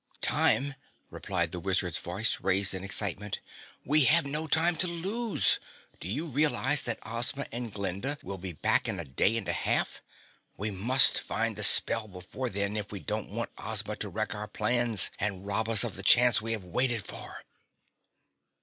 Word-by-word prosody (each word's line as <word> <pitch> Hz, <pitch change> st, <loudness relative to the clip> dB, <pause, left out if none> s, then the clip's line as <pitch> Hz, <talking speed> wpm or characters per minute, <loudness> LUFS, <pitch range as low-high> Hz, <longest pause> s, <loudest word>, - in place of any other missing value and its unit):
"Time!" 140 Hz, +1 st, +2 dB, 0.4 s
replied 85 Hz, -4 st, -2 dB
the 90 Hz, -, -4 dB
Wizard's 95 Hz, -2 st, 0 dB
voice, 100 Hz, +5 st, -2 dB
raised 95 Hz, +1 st, +2 dB
in 95 Hz, 0 st, -5 dB
excitement. 100 Hz, 0 st, -3 dB, 0.5 s
"We 150 Hz, 0 st, +4 dB
have 165 Hz, +3 st, +4 dB
no 150 Hz, +3 st, -3 dB
time 165 Hz, +3 st, +4 dB
to 185 Hz, -, +3 dB
lose! 195 Hz, +7 st, 0 dB, 0.4 s
Do -, -, -7 dB
you 135 Hz, -, -3 dB
realize 145 Hz, -1 st, +2 dB
that 120 Hz, -, -2 dB
Ozma 120 Hz, +5 st, -2 dB
and 120 Hz, -1 st, -4 dB
Glinda 100 Hz, +8 st, -3 dB
will 100 Hz, -1 st, -6 dB
be 95 Hz, 0 st, -6 dB
back 80 Hz, -, +1 dB
in 95 Hz, -, -3 dB
a 85 Hz, -, -4 dB
day 95 Hz, -, +1 dB
and 110 Hz, -, -5 dB
a -, -, 0 dB
half? -, -, -1 dB, 0.6 s
We 105 Hz, +2 st, -3 dB
must 120 Hz, +8 st, +5 dB
find -, -, -2 dB
the -, -, -5 dB
spell 115 Hz, -1 st, +3 dB
before 95 Hz, +7 st, -6 dB
then 100 Hz, +1 st, -2 dB
if 105 Hz, -1 st, -5 dB
we 100 Hz, -, -6 dB
don't -, -, -4 dB
want -, -, -4 dB
Ozma -, -, -3 dB
to -, -, -3 dB
wreck 100 Hz, -, -3 dB
our 105 Hz, +1 st, -6 dB
plans 120 Hz, 0 st, +3 dB
and 100 Hz, -2 st, -3 dB
rob 110 Hz, +3 st, -1 dB
us 110 Hz, -4 st, +6 dB
of -, -, -4 dB
the 100 Hz, -, -7 dB
chance 120 Hz, +4 st, +5 dB
we 115 Hz, +1 st, -2 dB
have 110 Hz, -4 st, -4 dB
waited 115 Hz, +4 st, -1 dB
for!" -, -, -9 dB
110 Hz, 180 wpm, -29 LUFS, 95-130 Hz, 0.6 s, us